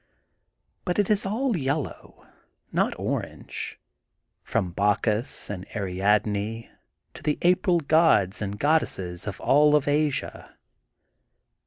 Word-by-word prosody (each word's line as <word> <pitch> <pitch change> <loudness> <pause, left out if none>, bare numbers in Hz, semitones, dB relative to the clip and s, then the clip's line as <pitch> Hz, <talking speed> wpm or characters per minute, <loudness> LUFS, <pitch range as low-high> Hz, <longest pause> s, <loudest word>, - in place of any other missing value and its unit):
But 180 -2 -2
it 205 0 +2
is 200 -1 +3
all 235 +4 0
yellow, 145 -2 -4 0.5
not - - 0
orange: - - -5 0.3
— - - -53
^from 90 -2 -1
Bacchus 105 +5 +1
and 95 -3 -5
Ariadne 105 +3 -1 0.4
to - - -12
the 150 - 0
April 180 0 +3
gods 145 - +3
and 100 0 -3
goddesses 100 - 0
of 100 - -5
all 150 +2 +4
of 150 -1 +1
Asia. 145 -1 -1
135 Hz, 115 wpm, -25 LUFS, 100-160 Hz, 0.5 s, all